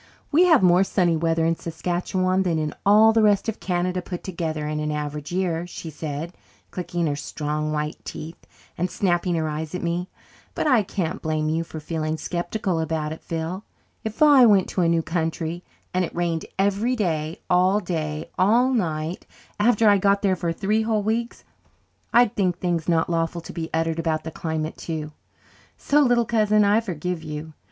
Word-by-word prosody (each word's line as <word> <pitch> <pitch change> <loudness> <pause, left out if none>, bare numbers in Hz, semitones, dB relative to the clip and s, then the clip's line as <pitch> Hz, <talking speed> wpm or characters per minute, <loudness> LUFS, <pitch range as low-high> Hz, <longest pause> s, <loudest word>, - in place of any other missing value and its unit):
"We 330 +5 +5
have 320 - +5
more 180 +1 +5
sunny 180 -3 +1
weather 165 0 +1
in 165 0 +2
Saskatchewan 180 +3 -1
than 175 -4 0
in 155 -1 -2
all 215 +2 +7
the 225 - +4
rest 205 -1 +3
of 225 - -3
Canada 180 0 -1
put 175 0 -7
together, 160 -4 -3
in 150 0 -2
an 150 0 -2
average 150 0 -4
year," 175 -2 -1
she 165 -2 -8
said, 155 +3 -5 0.4
clicking 175 -1 -2
her 145 -2 0
strong, 150 +1 -3
white 150 0 -3
teeth 160 +2 -8 0.3
and 180 +2 0
snapping 175 -1 0
her 160 -1 0
eyes 155 +2 -4
at 180 - -4
me. 175 +2 -2 0.5
"But - - -1
I 255 -7 +5
can't 185 -4 -3
blame 155 -1 -1
you 165 +1 0
for 160 -1 -8
feeling 155 0 -3
sceptical 175 +1 -2
about 160 -1 -2
it, 160 - -7
Phil. 165 +4 -4 0.4
If 220 +6 0
I 285 -4 +7
went 200 -4 +4
to 185 - -1
a 170 - +3
new 165 -1 +2
country 165 +1 -2 0.3
and 185 0 +2
it 170 - -5
rained 170 -2 -1
every 200 +6 +1
day 160 -6 -2
all 185 +3 +3
day 155 -5 -4
all 235 +7 +4
night 160 -6 -2 0.3
after 220 0 +4
I 205 -1 +6
got 200 +1 +2
there 190 -2 +3
for 170 -1 -2
three 210 +5 0
whole 220 -2 0
weeks 230 +3 -2 0.7
I'd 240 -1 +4
think 180 -4 +1
things 175 -2 -1
not 165 -1 +2
lawful 165 0 -1
to - - -10
be 165 -1 -4
uttered 165 0 0
about 160 -1 -1
the 160 - -6
climate 160 -1 -3
too. 155 -2 -5 0.7
So, 290 - +2
little 245 -3 +3
cousin, 215 -2 +3
I 205 +3 +4
forgive 180 -4 -4
you. 155 0 -7
175 Hz, 185 wpm, -24 LUFS, 160-200 Hz, 0.7 s, all